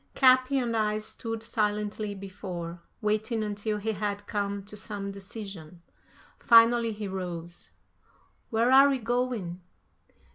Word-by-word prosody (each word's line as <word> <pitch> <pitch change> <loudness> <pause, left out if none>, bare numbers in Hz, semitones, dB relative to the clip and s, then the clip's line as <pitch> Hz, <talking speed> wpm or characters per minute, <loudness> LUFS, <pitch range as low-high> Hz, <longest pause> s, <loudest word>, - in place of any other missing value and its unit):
Capi 255 +1 +5
and 240 -3 0
I 215 -1 +1
stood 225 +1 -4
silently 210 -2 -1
before, 185 -3 -7 0.2
waiting 215 +1 0
until 210 0 -2
he 215 +2 -2
had 205 0 -3
come 200 -2 -2
to 210 +2 -9
some 205 -1 -5
decision. 195 -4 -9 0.6
Finally 230 0 +6
he 210 -1 -5
rose. 175 -3 -6 0.8
"Where 230 +2 +2
are 275 +1 +8
we 275 - +1
going?" 235 -7 -2
210 Hz, 120 wpm, -28 LUFS, 195-230 Hz, 0.8 s, are